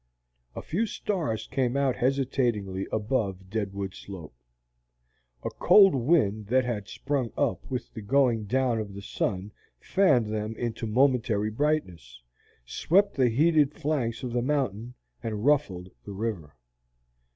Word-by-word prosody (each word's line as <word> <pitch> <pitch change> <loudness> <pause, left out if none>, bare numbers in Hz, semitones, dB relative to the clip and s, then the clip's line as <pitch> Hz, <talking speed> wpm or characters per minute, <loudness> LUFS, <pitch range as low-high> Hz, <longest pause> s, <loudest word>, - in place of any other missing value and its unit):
A - - -6
few 215 +8 -1
stars 155 - -2
came 130 +1 -1
out 140 -2 +1
hesitatingly 120 -7 0
above 100 -4 -2
Deadwood 100 -3 -3
Slope. 90 -8 -10 1.1
A - - -3
cold 195 -3 +6
wind 115 -7 +1
that 130 +3 +2
had 105 -5 -3
sprung 130 -3 -2
up 90 - -1
with 125 -2 -5
the 110 - -7
going 120 -1 +2
down 125 +1 +1
of 100 -2 -6
the 100 - -8
sun 100 0 -3 0.3
fanned 130 - +2
them 110 +1 -3
into 115 -1 -3
momentary 115 -3 +2
brightness, 95 - -2 0.5
swept 195 - +2
the 130 -3 +3
heated 150 +3 +3
flanks 140 -6 -2
of 125 -2 -4
the 120 - +1
mountain, 125 -4 -2 0.3
and 110 -1 -4
ruffled 100 -12 +1
the 100 - -8
river. 95 - -4
115 Hz, 135 wpm, -27 LUFS, 100-135 Hz, 1.1 s, cold